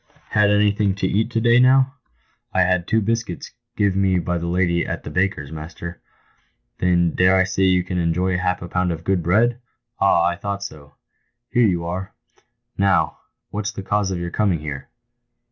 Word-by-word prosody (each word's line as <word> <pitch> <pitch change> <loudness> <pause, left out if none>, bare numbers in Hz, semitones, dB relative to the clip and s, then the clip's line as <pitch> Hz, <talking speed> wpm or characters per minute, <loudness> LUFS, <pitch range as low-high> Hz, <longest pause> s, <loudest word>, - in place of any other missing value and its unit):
" - - -31
Had 105 -1 +3
anything 105 -1 +2
to 100 - -2
eat 110 +4 0
to 115 -1 -1
day, 120 +1 +4
now 130 +1 +4 0.2
?". - - -42
» - - -41
" - - -44
I 95 - +4
had 90 -1 +1
two 110 -1 +2
buscuits 115 -4 -3 0.3
give 100 -3 +2
me 95 -1 +2
by 90 0 -1
the 85 - -4
lady 85 -1 +1
at - - -5
the - - -7
baker's, 90 -6 -1
master." 85 +2 -8 0.4
" - - -45
Then 85 -2 +2
I - - -10
dare 95 +1 +4
say 95 0 0
you 90 -1 +3
can 90 0 -3
enjoy 90 +2 0
half 90 0 -1
a - - -6
pound 90 0 0
of 80 0 -5
good 95 0 +1
bread? 115 +8 +2 0.4
Ah, 85 - +4
I 85 0 0
thought 100 +1 -4
so. 75 -6 -10 0.6
Here 120 -2 +4
you 85 -3 -1
are! 90 +3 -5 0.6
Now, 100 -1 +2 0.3
what's 105 0 -3
the 100 - -6
cause 100 0 0
of 95 - -2
your 85 0 -4
coming 100 -4 +1
here 70 -3 -6
95 Hz, 205 wpm, -21 LUFS, 85-100 Hz, 0.6 s, day